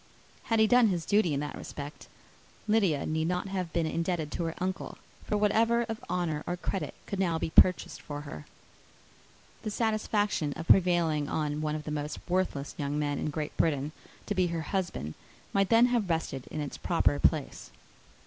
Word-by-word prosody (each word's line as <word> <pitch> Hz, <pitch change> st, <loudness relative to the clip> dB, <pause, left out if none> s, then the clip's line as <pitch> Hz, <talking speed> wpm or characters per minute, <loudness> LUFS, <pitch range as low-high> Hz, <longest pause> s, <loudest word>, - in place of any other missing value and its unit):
Had 225 Hz, -1 st, +2 dB
he 220 Hz, -, +7 dB
done 245 Hz, +1 st, +6 dB
his 175 Hz, -5 st, -1 dB
duty 205 Hz, -5 st, +3 dB
in 140 Hz, -1 st, 0 dB
that 150 Hz, -, -4 dB
respect, 145 Hz, +1 st, -8 dB, 0.6 s
Lydia 200 Hz, -9 st, +2 dB
need 160 Hz, +1 st, 0 dB
not 180 Hz, +2 st, -1 dB
have 185 Hz, -3 st, -3 dB
been 170 Hz, 0 st, +1 dB
indebted 165 Hz, -1 st, -1 dB
to 170 Hz, -, -2 dB
her 165 Hz, -, -3 dB
uncle 185 Hz, +1 st, -3 dB, 0.3 s
for 210 Hz, -, 0 dB
whatever 225 Hz, +3 st, +3 dB
of 225 Hz, -1 st, -5 dB
honour 170 Hz, -4 st, -1 dB
or 175 Hz, 0 st, -1 dB
credit 175 Hz, -4 st, -3 dB
could 200 Hz, -, -4 dB
now 170 Hz, -4 st, +2 dB
be 160 Hz, -, -3 dB
purchased 185 Hz, +2 st, +4 dB
for 145 Hz, -1 st, -6 dB
her. 75 Hz, -, -9 dB, 1.1 s
The -, -, -3 dB
satisfaction 210 Hz, -7 st, 0 dB
of 165 Hz, +3 st, -7 dB
prevailing 170 Hz, -5 st, +4 dB
on 150 Hz, -1 st, -1 dB
one 155 Hz, 0 st, -1 dB
of 155 Hz, -, -4 dB
the 150 Hz, -, -5 dB
most 150 Hz, 0 st, -3 dB
worthless 175 Hz, -6 st, -1 dB
young 145 Hz, 0 st, -1 dB
men 145 Hz, -1 st, -1 dB
in -, -, -1 dB
Great 150 Hz, 0 st, -4 dB
Britain 145 Hz, -2 st, +1 dB, 0.3 s
to 205 Hz, -, -1 dB
be 185 Hz, -2 st, +2 dB
her 170 Hz, -1 st, -2 dB
husband 175 Hz, -, -2 dB, 0.4 s
might 195 Hz, -1 st, +2 dB
then 230 Hz, +1 st, +7 dB
have 220 Hz, -6 st, +1 dB
rested 160 Hz, -6 st, -2 dB
in 155 Hz, -, -4 dB
its 145 Hz, -, -5 dB
proper 165 Hz, -4 st, +2 dB
place. 150 Hz, -3 st, 0 dB
170 Hz, 185 wpm, -29 LUFS, 150-195 Hz, 1.1 s, he